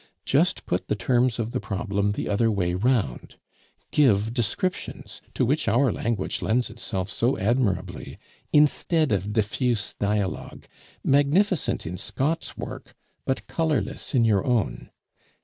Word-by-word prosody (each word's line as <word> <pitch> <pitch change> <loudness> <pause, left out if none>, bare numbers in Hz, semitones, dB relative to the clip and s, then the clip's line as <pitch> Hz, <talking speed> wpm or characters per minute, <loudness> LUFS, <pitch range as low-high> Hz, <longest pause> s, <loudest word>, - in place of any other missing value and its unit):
Just 170 +7 +2
put 90 - -2
the - - 0
terms 120 +4 +1
of 115 -1 -2
the - - -1
problem 100 -1 -1
the - - -3
other 115 +3 +2
way 90 -5 0
round. 100 - 0 0.6
Give 110 -6 +3
descriptions, 135 - -3
to - - +2
which 145 +6 0
our 125 +1 +3
language 115 -5 -2
lends 120 0 +1
itself 95 -4 -3
so 115 +6 0
admirably, 110 -1 -1 0.3
instead 150 +1 +3
of 100 0 0
diffuse 110 +1 0
dialogue, 100 -2 -2 0.4
magnificent 150 +6 +2
in 90 +3 -4
Scott's 140 - -2
work, - - -8 0.3
but 130 - -1
colorless 155 -3 -1
in 120 -2 +4
your 105 -4 +3
own. 120 -4 -1
115 Hz, 130 wpm, -25 LUFS, 100-135 Hz, 0.6 s, in